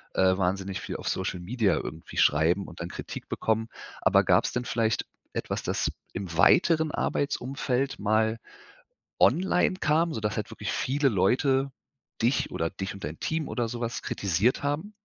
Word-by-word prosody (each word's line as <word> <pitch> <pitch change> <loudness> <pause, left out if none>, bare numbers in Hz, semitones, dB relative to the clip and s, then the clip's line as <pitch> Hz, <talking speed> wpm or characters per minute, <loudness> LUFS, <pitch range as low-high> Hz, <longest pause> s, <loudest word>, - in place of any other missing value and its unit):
äh, 95 0 +4
wahnsinnig 95 0 -1
viel - - -5
auf - - -7
Social 95 -1 -2
Media 105 +3 +1
irgendwie 80 +1 -6
schreiben 80 +6 +3
und 85 - -11
dann 85 - -4
Kritik - - -7
bekommen. 110 0 0 0.3
Aber - - +5
gab's - - +3
denn 120 0 -2
vielleicht 115 -1 0 0.3
etwas, - - -3
das - - 0 0.2
im 90 -4 -5
weiteren 160 - +5
Arbeitsumfeld 135 -1 -1
mal 110 +2 +1 0.8
online 180 +5 +3
kam, 165 -1 +1
sodass 105 -2 -2
halt - - -3
wirklich - - -4
viele 135 +1 +1
Leute 130 +7 +2 0.5
dich 120 +4 +2
oder 80 0 -1
dich 95 +2 -5
und 100 - -11
dein 75 +3 -5
Team 160 -1 -2
oder 120 -2 -1
so 120 +1 -5
was 120 -1 -3
kritisiert 100 - 0
haben? 150 +9 -2
115 Hz, 160 wpm, -27 LUFS, 95-140 Hz, 0.8 s, Aber